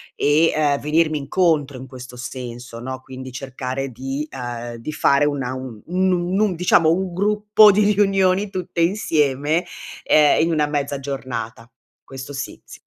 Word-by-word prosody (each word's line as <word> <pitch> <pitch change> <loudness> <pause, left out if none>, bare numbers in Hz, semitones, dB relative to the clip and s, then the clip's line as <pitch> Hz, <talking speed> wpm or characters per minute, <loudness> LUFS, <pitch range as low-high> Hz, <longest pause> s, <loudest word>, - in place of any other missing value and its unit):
e, 155 +3 +3
ehm, 145 -2 +1
venirmi 155 +1 +1
incontro, 145 -2 +1
in 130 +1 -9
questo 125 -1 -11
senso, 120 -1 -7
no, 130 +2 -6
quindi, 130 0 -9
cercare 130 +1 -5
di, 135 +5 -4
ehm, 120 -2 -6
di 115 +6 -6
fare 140 -1 +3
una 135 -3 -2
un 130 -4 -7
un 185 +2 0
nun 180 0 0
nun 200 -1 +2
diciamo, 165 -2 +4
1 185 +1 -1
gruppo 210 +2 +5
di 205 +1 +3
riunioni, 195 0 +2
tutte 180 -3 -3
insieme, 155 -4 +1 0.4
ehm, 150 -1 +4
in 165 - +1
1 155 -2 +2
mezza 145 -1 -2
giornata. 125 -4 -6 0.3
Questo 135 +1 -9
sì, 135 0 -6
s - - -12
145 Hz, 160 wpm, -21 LUFS, 130-175 Hz, 0.4 s, gruppo